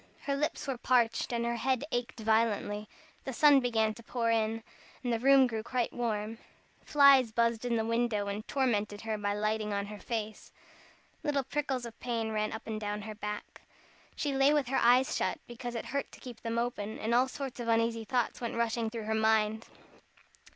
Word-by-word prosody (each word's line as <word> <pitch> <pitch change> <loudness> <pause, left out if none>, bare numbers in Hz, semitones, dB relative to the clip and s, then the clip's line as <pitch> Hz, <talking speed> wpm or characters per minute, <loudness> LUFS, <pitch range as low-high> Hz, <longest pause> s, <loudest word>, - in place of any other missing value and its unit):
Her 280 - -1
lips 300 +3 -2
were 265 -3 -3
parched 235 -2 +2
and 235 -1 -1
her 235 0 -1
head 260 +2 0
ached 245 0 -3
violently. 215 -1 +1 0.3
The 265 - -5
sun 290 +2 +6
began 225 -4 +1
to 235 - -12
pour 230 0 -1
in, 225 0 0 0.4
the 240 -2 0
room 270 +1 +6
grew 225 -3 -2 0.3
warm. 225 -2 -3 0.4
Flies 275 -5 +6
buzzed 230 +1 +1
in 240 -1 +1
the 220 -1 0
window, 230 -2 0
and 205 +2 -4
tormented 215 -6 0
her 220 -1 -2
by 205 0 -1
lighting 215 0 -1
on 200 0 -1
her 210 0 -8
face. 220 -2 -5 0.7
Little 285 -2 0
prickles 270 -2 -2
of 230 -1 -10
pain 230 -2 -2
ran 215 0 -1
up 220 - -7
and 220 -1 -4
down 210 0 -3
her 215 0 -6
back. 210 0 -6 0.5
She 290 -2 -1
lay 270 +1 +4
with 280 -5 +1
her 270 - +2
eyes 250 +2 +4
shut, - - 0
because 240 0 -7
it 230 - -4
hurt 280 0 -3
to - - -12
keep 250 -3 -10
them 230 0 -3
open, 225 -3 -2
and 225 +2 -1
all 250 +2 +4
sorts 265 -1 -6
of 240 - -4
uneasy 230 0 +1
thoughts 245 +1 -1
went 235 - -3
rushing 230 -1 0
through 225 -1 -5
her 220 +1 -2
mind. 220 0 +2
230 Hz, 195 wpm, -31 LUFS, 220-250 Hz, 0.7 s, sun